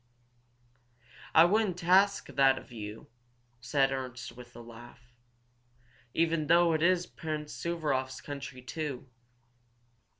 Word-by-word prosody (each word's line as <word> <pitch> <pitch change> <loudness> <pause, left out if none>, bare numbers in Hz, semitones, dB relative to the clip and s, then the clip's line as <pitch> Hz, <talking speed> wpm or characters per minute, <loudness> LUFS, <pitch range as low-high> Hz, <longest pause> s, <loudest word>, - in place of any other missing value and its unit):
"I 160 - +9
wouldn't 190 -2 +1
ask 195 +3 +4
that 135 -1 +3
of - - -11
you," 105 -1 -8 0.5
said 135 +3 +1
Ernst, 130 -2 -5
with 120 -1 -13
a - - -10
laugh. 120 +1 -14 1.0
"Even 165 -2 +1
though 170 +1 +5
it 155 - 0
is 180 +1 +3
Prince 155 -3 -6
Suvaroff's 140 -6 -2
country, 140 -3 -8
too?" 140 -1 -5
145 Hz, 110 wpm, -30 LUFS, 125-170 Hz, 1.0 s, I